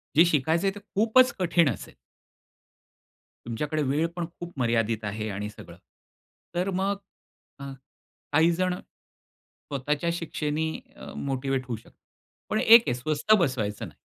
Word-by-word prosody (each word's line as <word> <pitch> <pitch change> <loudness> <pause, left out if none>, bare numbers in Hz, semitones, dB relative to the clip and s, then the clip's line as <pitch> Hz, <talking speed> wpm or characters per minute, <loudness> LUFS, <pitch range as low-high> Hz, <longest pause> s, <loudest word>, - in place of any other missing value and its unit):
जे 165 +3 +8
शिकायचं 160 +6 +2
आहे 195 - 0
ते - - -7
खूपच 220 +5 +3
कठीण 170 -4 +3
असेल. - - -6 1.5
तुमच्याकडे 150 +7 -2
वेळ 145 +5 +1
पण 175 -1 -2
खूप 175 0 -7
मर्यादित 115 -2 +1
आहे 105 +1 -3
आणि 105 +1 -4
सगळं. - - -12 0.8
तर 180 +2 0
मग 195 +2 0 0.6
अ, - - -8 0.7
काही 160 +3 +5
जणं 180 +1 0
स्वतःच्या 145 +4 -6
शिक्षेनी 160 -2 -2 0.2
अ, - - -10
मोटिवेट 135 -1 -2
होऊ 120 - -2
शकतात 110 - -19 0.5
पण 215 - +1
एक 230 +1 +8
आहे - - +2
स्वस्थ 155 - +1
बसवायचं 130 - 0
नाही. - - -16
155 Hz, 135 wpm, -27 LUFS, 130-180 Hz, 1.5 s, जे